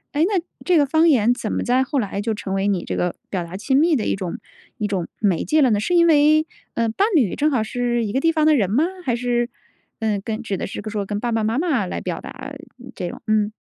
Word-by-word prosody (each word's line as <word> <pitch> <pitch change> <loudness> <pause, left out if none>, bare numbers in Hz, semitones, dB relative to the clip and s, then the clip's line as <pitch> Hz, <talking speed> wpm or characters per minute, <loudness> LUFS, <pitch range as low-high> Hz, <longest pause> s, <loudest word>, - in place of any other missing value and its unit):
诶 300 - +3
那， 380 -1 +1 0.2
这 360 -3 +3
个 290 - +4
方 320 +4 +3
言 240 -4 +4
怎 225 -3 -4
么 - - -1
在 255 +2 +2
后 265 +1 -1
来 200 -2 -2
就 220 +1 -1
成 195 -2 -5
为 195 +1 +1
你 190 -4 -1
这 - - -3
个， 180 -1 -1
表 185 -3 -2
达 170 +2 -7
亲 265 +6 +1
密 320 0 +4
的 215 - -2
一 - - +1
种 185 -3 -4 0.4
一 210 - -1
种， 190 -4 -2
媒 195 -6 +1
介 310 0 +2
了 265 - +5
呢？ 205 - +2
是 355 - -1
因 340 -1 +5
为， 310 0 +4 0.3
呃， 230 0 0
伴 225 - +1
侣 240 - +3
正 300 +1 +1
好 240 -5 +1
是 240 0 -1
一 205 - -4
个 265 - +1
地 330 +2 +3
方 310 -2 +1
的 310 - +5
人 200 -8 +1
吗？ 275 +9 +3 0.2
还 250 - 0
是， 240 0 0 0.5
呃， 220 -3 0
跟 220 0 -3
指 210 -4 -3
的 - - -4
是 - - -6
说 210 -2 -2
跟 205 +1 -3
爸 240 +1 -2
爸 225 -1 +1
妈 225 +6 0
妈 295 - +1
来 180 - -4
表 - - -4
达， - - -8 0.5
嗯， 255 +1 -11
这 175 - -4
种。 - - -10
嗯。 215 -1 +2
235 Hz, 290 characters per minute, -21 LUFS, 205-290 Hz, 0.5 s, 了